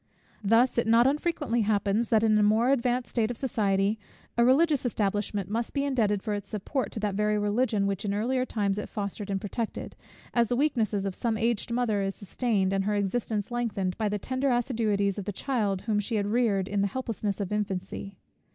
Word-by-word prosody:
Thus 230 Hz, +4 st, +4 dB
it 235 Hz, -, 0 dB
not 230 Hz, +2 st, +5 dB
unfrequently 290 Hz, -4 st, +1 dB
happens, 210 Hz, +1 st, +1 dB
that 220 Hz, -1 st, +3 dB
in 220 Hz, -1 st, +4 dB
a 210 Hz, -, +4 dB
more 220 Hz, +5 st, +4 dB
advanced 250 Hz, -1 st, 0 dB
state 225 Hz, -2 st, +1 dB
of 245 Hz, -, -4 dB
society, 205 Hz, -4 st, +1 dB, 0.4 s
a 235 Hz, -, +4 dB
religious 290 Hz, +3 st, +4 dB
establishment 205 Hz, -4 st, -1 dB
must 230 Hz, +6 st, -3 dB
be 280 Hz, -, +1 dB
indebted 215 Hz, -8 st, +1 dB
for 215 Hz, -, -2 dB
its 205 Hz, -1 st, -4 dB
support 220 Hz, +6 st, -3 dB
to -, -, -4 dB
that 210 Hz, -2 st, 0 dB
very 210 Hz, +1 st, +1 dB
Religion, 210 Hz, 0 st, +1 dB
which 200 Hz, -1 st, -2 dB
in 205 Hz, -, -1 dB
earlier 245 Hz, +5 st, 0 dB
times 205 Hz, -5 st, -1 dB
it -, -, -6 dB
fostered 205 Hz, -1 st, -4 dB
and 195 Hz, -1 st, 0 dB
protected; 215 Hz, +3 st, -4 dB, 0.4 s
as 235 Hz, -1 st, +3 dB
the 245 Hz, -, 0 dB
weakness 240 Hz, -6 st, +1 dB
of 195 Hz, -1 st, -1 dB
some 225 Hz, +2 st, -1 dB
aged 230 Hz, 0 st, 0 dB
mother 235 Hz, -4 st, +1 dB
is 195 Hz, 0 st, -2 dB
sustained, 200 Hz, -2 st, 0 dB
and 195 Hz, 0 st, 0 dB
her 210 Hz, 0 st, +1 dB
existence 205 Hz, +1 st, -1 dB
lengthened, 205 Hz, -7 st, -1 dB
by 215 Hz, -2 st, +1 dB
the 210 Hz, -, -1 dB
tender 260 Hz, +6 st, -1 dB
assiduities 220 Hz, -5 st, +1 dB
of 195 Hz, -, -5 dB
the 205 Hz, -, -2 dB
child 205 Hz, -4 st, -1 dB
whom 210 Hz, -1 st, +1 dB
she 215 Hz, +3 st, -2 dB
had 205 Hz, -1 st, +1 dB
reared 205 Hz, -3 st, +1 dB
in 205 Hz, -1 st, 0 dB
the 200 Hz, -, +2 dB
helplessness 220 Hz, -3 st, -3 dB
of 200 Hz, -2 st, -3 dB
infancy. 200 Hz, -1 st, -3 dB
215 Hz, 205 wpm, -28 LUFS, 200-240 Hz, 0.4 s, not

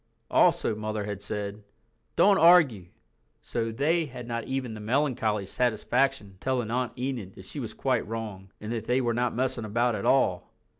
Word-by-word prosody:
Also -, -, +4 dB
Mother 110 Hz, 0 st, -3 dB
had 100 Hz, -1 st, -5 dB
said, 105 Hz, 0 st, -4 dB, 0.5 s
"Don't 200 Hz, -1 st, +5 dB
argue," 155 Hz, -, +6 dB, 0.5 s
so 115 Hz, -1 st, -3 dB
they 160 Hz, +8 st, +1 dB
had 125 Hz, -2 st, -9 dB
not 115 Hz, -1 st, -3 dB
even 130 Hz, -3 st, -3 dB
the 110 Hz, -, -7 dB
melancholy 110 Hz, -3 st, 0 dB
satisfaction 125 Hz, +1 st, 0 dB
of 95 Hz, -, -22 dB
telling 125 Hz, -3 st, -1 dB
Aunt 125 Hz, 0 st, -2 dB
Enid 125 Hz, -7 st, -4 dB
that -, -, -12 dB
she -, -, -6 dB
was -, -, -6 dB
quite -, -, 0 dB
wrong, 105 Hz, -4 st, -6 dB
and 105 Hz, +1 st, -6 dB
that 115 Hz, -2 st, -3 dB
they 125 Hz, +1 st, +2 dB
were 120 Hz, -2 st, 0 dB
not 120 Hz, 0 st, 0 dB
messing 130 Hz, -1 st, -1 dB
about 120 Hz, +3 st, +1 dB
at -, -, -3 dB
all. 95 Hz, -10 st, +2 dB
115 Hz, 180 wpm, -27 LUFS, 105-130 Hz, 0.5 s, argue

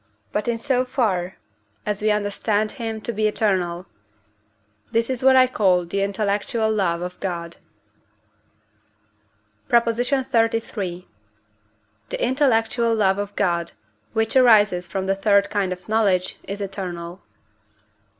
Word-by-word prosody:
but 210 Hz, -, -2 dB
in 235 Hz, -1 st, 0 dB
so 255 Hz, +1 st, +1 dB
far 195 Hz, -9 st, -1 dB, 0.5 s
as 210 Hz, -1 st, -2 dB
we 215 Hz, -, +2 dB
understand 210 Hz, +1 st, 0 dB
him 225 Hz, -3 st, -5 dB
to 235 Hz, +2 st, -5 dB
be 215 Hz, 0 st, +1 dB
eternal; 185 Hz, -5 st, 0 dB, 1.1 s
this 230 Hz, +2 st, +1 dB
is 255 Hz, -1 st, -3 dB
what 265 Hz, 0 st, +6 dB
I 260 Hz, 0 st, +7 dB
call 190 Hz, -8 st, +2 dB
the 195 Hz, +4 st, -2 dB
intellectual 205 Hz, +2 st, 0 dB
love 175 Hz, -5 st, 0 dB
of 180 Hz, 0 st, -7 dB
God. 170 Hz, -3 st, -5 dB, 2.1 s
PROP. 235 Hz, 0 st, +4 dB
XXXIII. 230 Hz, -7 st, -1 dB, 1.0 s
The -, -, -3 dB
intellectual 235 Hz, -3 st, +2 dB
love 195 Hz, -2 st, +2 dB
of 205 Hz, 0 st, -5 dB
God, 170 Hz, -4 st, 0 dB, 0.4 s
which 225 Hz, +3 st, 0 dB
arises 210 Hz, -8 st, +5 dB
from 190 Hz, +2 st, -3 dB
the 195 Hz, -, +1 dB
third 200 Hz, 0 st, +2 dB
kind 200 Hz, -3 st, 0 dB
of 180 Hz, 0 st, -7 dB
knowledge, 200 Hz, -4 st, +1 dB
is 200 Hz, +1 st, -5 dB
eternal. 180 Hz, -2 st, -6 dB
210 Hz, 125 wpm, -22 LUFS, 185-230 Hz, 2.1 s, I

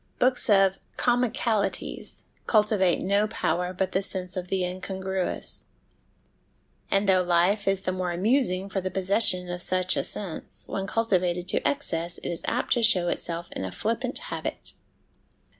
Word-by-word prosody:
Books 250 Hz, -1 st, +3 dB
of 195 Hz, -2 st, +5 dB
' -, -, -24 dB
comicalities 240 Hz, -3 st, 0 dB
' -, -, -26 dB
cultivate 210 Hz, -5 st, +3 dB
no 200 Hz, +3 st, +2 dB
power 180 Hz, -4 st, -1 dB
but 185 Hz, 0 st, -1 dB
the 190 Hz, -, +1 dB
sense 185 Hz, -2 st, -4 dB
of 180 Hz, -1 st, -4 dB
the 190 Hz, 0 st, 0 dB
incongruous; 190 Hz, 0 st, -3 dB, 1.2 s
and 195 Hz, +1 st, +2 dB
though 185 Hz, -1 st, +5 dB
life 180 Hz, +4 st, +2 dB
is 195 Hz, -1 st, +2 dB
the 185 Hz, -, -1 dB
more 185 Hz, -1 st, -2 dB
amusing 195 Hz, 0 st, +1 dB
for 195 Hz, -1 st, -2 dB
the 185 Hz, -, -2 dB
possession 185 Hz, -1 st, +2 dB
of 180 Hz, 0 st, -3 dB
such 185 Hz, 0 st, +1 dB
a -, -, 0 dB
sense, 190 Hz, -6 st, -2 dB
when 195 Hz, 0 st, -3 dB
cultivated 185 Hz, -5 st, 0 dB
to -, -, +2 dB
excess 175 Hz, -12 st, -1 dB
it -, -, -5 dB
is 170 Hz, -, -3 dB
apt -, -, +1 dB
to 240 Hz, -, +1 dB
show 185 Hz, -6 st, +4 dB
itself 170 Hz, 0 st, -2 dB
in -, -, -5 dB
a 95 Hz, -, -4 dB
flippant 230 Hz, -, -2 dB
habit. -, -, -4 dB
190 Hz, 160 wpm, -26 LUFS, 180-210 Hz, 1.2 s, of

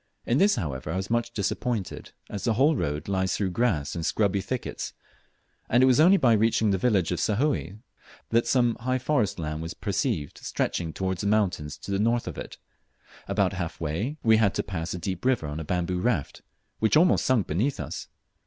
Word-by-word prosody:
In 120 Hz, +4 st, +2 dB
this 205 Hz, +1 st, +5 dB
however 75 Hz, -, -4 dB
I -, -, -2 dB
was 95 Hz, +3 st, -3 dB
much 120 Hz, 0 st, +1 dB
disappointed, 110 Hz, -1 st, -3 dB, 0.2 s
as 100 Hz, -, -6 dB
the 115 Hz, -, +2 dB
whole 145 Hz, +6 st, +4 dB
road 75 Hz, -, -2 dB
lies 95 Hz, -1 st, 0 dB
through 95 Hz, -3 st, -1 dB
grass 90 Hz, -10 st, 0 dB
and 85 Hz, -, -4 dB
scrubby 100 Hz, +1 st, +1 dB
thickets, 130 Hz, +5 st, -4 dB, 0.8 s
and 120 Hz, +2 st, +4 dB
it -, -, +8 dB
was 130 Hz, +1 st, +4 dB
only 180 Hz, +5 st, +7 dB
after 115 Hz, -, +4 dB
reaching 110 Hz, -1 st, +2 dB
the 95 Hz, -, +1 dB
village 100 Hz, -7 st, +2 dB
of 90 Hz, -, -1 dB
Sahoe 110 Hz, -, 0 dB, 0.5 s
that 115 Hz, +1 st, +2 dB
some 120 Hz, -3 st, +3 dB
high 130 Hz, +2 st, 0 dB
forest 120 Hz, -7 st, 0 dB
land 75 Hz, -2 st, -4 dB
was 80 Hz, +1 st, -6 dB
perceived 75 Hz, -2 st, -2 dB
stretching 85 Hz, -2 st, -2 dB
towards 95 Hz, +1 st, -2 dB
the 100 Hz, -, -1 dB
mountains 90 Hz, -8 st, 0 dB
to -, -, -8 dB
the 100 Hz, -, 0 dB
north 115 Hz, +2 st, +1 dB
of -, -, -5 dB
it. -, -, -8 dB, 0.7 s
About 100 Hz, -1 st, +1 dB
half 85 Hz, -3 st, -4 dB
way 85 Hz, -, -2 dB
we 110 Hz, -1 st, +5 dB
dad 100 Hz, -3 st, +2 dB
to -, -, 0 dB
pass 85 Hz, -2 st, -4 dB
a -, -, -4 dB
deep 90 Hz, +1 st, -4 dB
river 125 Hz, -10 st, +2 dB
on 75 Hz, +1 st, -4 dB
a -, -, -4 dB
bamboo 90 Hz, +2 st, -1 dB
raft, 90 Hz, -, -1 dB, 0.4 s
which 110 Hz, +6 st, +3 dB
almost 175 Hz, +3 st, +4 dB
sunk 125 Hz, -7 st, +2 dB
beneath 110 Hz, -, -1 dB
us. -, -, -5 dB
100 Hz, 200 wpm, -26 LUFS, 85-120 Hz, 0.8 s, it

